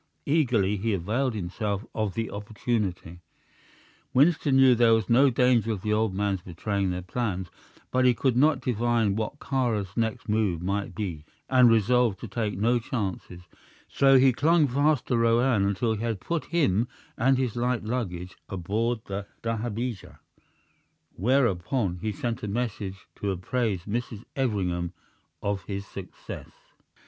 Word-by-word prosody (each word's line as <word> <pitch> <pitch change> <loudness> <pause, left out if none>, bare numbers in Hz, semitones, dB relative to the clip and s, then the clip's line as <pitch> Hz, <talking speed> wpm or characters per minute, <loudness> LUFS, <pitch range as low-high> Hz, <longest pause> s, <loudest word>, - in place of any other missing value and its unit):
Eagerly 120 -10 +2
he 105 +1 0
availed 110 +8 -1
himself 100 +2 -3
of 110 -4 -2
the 115 -2 -2
opportunity. 100 -4 -3 1.0
Winston 145 0 +4
knew 135 -1 +7
there 115 -1 +5
was 110 - -1
no 130 +4 +5
danger 120 -2 +3
of 95 - -6
the 105 - +1
old 110 -1 +1
man's 100 -2 0
betraying 95 +2 -2
their 90 0 -3
plans, 95 -2 -3 0.4
but 130 0 +2
he 125 -1 +5
could 130 0 +1
not 140 +1 +3
divine 120 -4 +1
what 110 +6 -3
Kāra's 115 -10 -1
next 115 -2 -1
move 105 -5 +1
might 100 +3 -2
be, 90 -8 -4 0.3
and 125 -2 +7
resolved 115 -1 +3
to 120 - -5
take 105 -2 -2
no 120 +4 +2
chances; 95 -6 -4 0.5
so 135 -1 +5
he 130 0 +5
clung 155 +4 +3
fast 145 +2 +2
to 125 - 0
Roane 115 -2 +3
until 110 +3 0
he 110 - -4
had 115 -4 -2
put 170 - -3
him 120 - +1 0.3
and 130 +2 +3
his 125 -4 -1
light 120 -1 0
luggage 90 -7 -4
aboard 110 +6 -1
the 100 +1 -5 0.2
dahabeah, 115 -1 -3 1.0
whereupon 100 -3 +1
he 110 - -1
sent 120 +4 -3
a 105 - -4
messenger 105 -3 -3 0.2
to 100 - -2
apprise 95 +1 -1
Mrs. 115 +1 -4
Everingham 90 -9 -1 0.5
of 100 -1 -1
his 100 -1 -4
success. 95 -2 -9
110 Hz, 150 wpm, -27 LUFS, 100-125 Hz, 1.0 s, knew